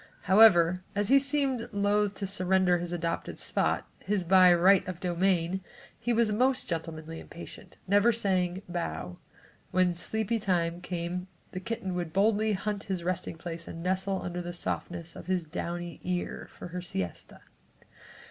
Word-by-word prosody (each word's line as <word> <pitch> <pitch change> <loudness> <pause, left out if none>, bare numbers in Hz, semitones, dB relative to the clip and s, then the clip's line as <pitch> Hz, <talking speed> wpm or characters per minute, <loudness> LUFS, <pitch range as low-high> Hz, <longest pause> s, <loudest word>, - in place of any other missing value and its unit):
However 185 -3 +6
as 205 +1 +1
he 275 +1 +7
seemed 275 -3 0
loathe 205 0 +1
to 200 - -3
surrender 185 -2 +2
this 175 0 -4
adopted 170 -1 -3
spot, - - 0
his 205 -3 -1
by 185 +1 +7
"right 185 +3 +5
of 180 -2 -5
domain," 180 0 +1 0.4
he 240 - -1
was 230 -2 +3
most 255 +5 +2
gentlemanly 165 -1 -5
and - - -13
patient, 170 - -10
never 205 +4 +5
even 230 -1 +1
saying 185 -3 0
"bow." 90 - -4 0.5
When 185 -1 +2
sleepy 220 +5 -1
time 175 -3 0
came 180 +1 -4 0.2
the 185 - -4
kitten 190 -2 -4
would 175 -3 -3
boldly 215 +2 +3
hunt 205 +1 -3
his 190 -4 -3
resting 175 -1 -2
place 170 0 -6
and 165 - -7
nestle 190 +1 0
under 175 0 -4
the 175 0 -6
softness 175 -1 -4
of - - -10
his 185 -3 0
downy 170 +1 -5
ear 180 -1 -3
for - - -10
her 180 +1 -5
siesta. 95 - -5
185 Hz, 160 wpm, -29 LUFS, 175-200 Hz, 0.5 s, he